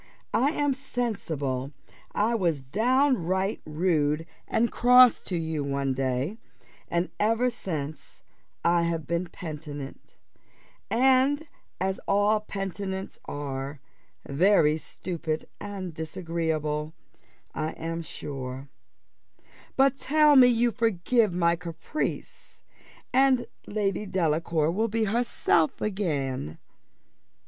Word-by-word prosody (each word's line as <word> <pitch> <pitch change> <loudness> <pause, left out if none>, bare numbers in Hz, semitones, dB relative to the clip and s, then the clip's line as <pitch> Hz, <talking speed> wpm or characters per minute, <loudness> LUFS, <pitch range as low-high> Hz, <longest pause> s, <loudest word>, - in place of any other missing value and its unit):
I 245 +6 +3
am 290 -3 +1
sensible 160 - -3 0.4
I 220 +3 +2
was 170 - 0
downright 210 - +1
rude 155 -1 +1 0.2
and 235 +1 +1
cross 250 0 +6
to 180 - -3
you 160 -2 -2
one 140 -1 -1
day, 135 - -1 0.5
and 170 +1 0
ever 230 +4 +2
since 155 -9 -6 0.4
I 170 0 +4
have 165 -2 -1
been 170 +4 -1
penitent; 150 -5 -8 0.7
and, 265 +5 +3 0.3
as 190 +1 -1
all 205 +2 +3
penitents 195 -2 -5
are, 140 0 -5 0.5
very 155 0 +4
stupid 160 0 -4
and 195 -4 -6
disagreeable, 160 -2 -2 0.6
I 155 +1 -2
am 165 +1 -4
sure: 135 -3 -6 1.1
but 270 0 +4
tell 300 0 +5
me 255 -2 +9
you 240 0 +3
forgive 225 -2 +1
my 170 -1 +3
caprice, 180 - -5 0.5
and 260 -1 +4 0.2
Lady 205 -1 -1
Delacour 165 -3 +1
will 220 +6 +1
be 225 +1 0
herself 215 -7 +1
again." 140 - -2
180 Hz, 100 wpm, -27 LUFS, 155-225 Hz, 1.1 s, me